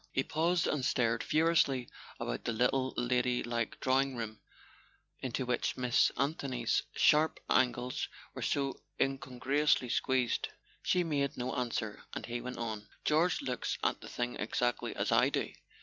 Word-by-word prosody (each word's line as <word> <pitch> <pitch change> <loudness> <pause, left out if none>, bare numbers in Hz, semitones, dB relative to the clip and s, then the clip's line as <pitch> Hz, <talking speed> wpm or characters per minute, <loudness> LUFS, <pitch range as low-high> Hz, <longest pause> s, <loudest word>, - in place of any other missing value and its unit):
He 135 - +1
paused 165 +4 +1
and 145 -3 0
stared 115 -3 +2
furiously 155 -6 +2 0.3
about - - -3
the 115 - 0
little 130 +3 +1
lady¬ 125 0 +1
like 120 -1 -2
drawing 135 0 +2
room 110 -2 -5 0.8
into 130 0 -2
which 125 -1 0
Miss 125 0 +3
Anthony's 135 -4 0
sharp 155 +1 +4
angles 125 0 +1 0.3
were - - -6
so 140 -1 -1 0.2
incongruously 135 0 +1
squeezed. 130 -1 +1 0.3
She 180 - +2
made 145 -3 -1
no 125 +1 -2
answer, 115 -4 -2
and - - -4
he 120 0 -4
went 125 +1 -6
on: 110 -3 -4 0.2
"George 165 +4 +3
looks 125 -1 -2
at - - +1
the - - -9
thing 120 0 -3
exactly 120 +3 -1
as - - -1
I - - +5
do." - - -2
125 Hz, 150 wpm, -32 LUFS, 120-140 Hz, 0.8 s, I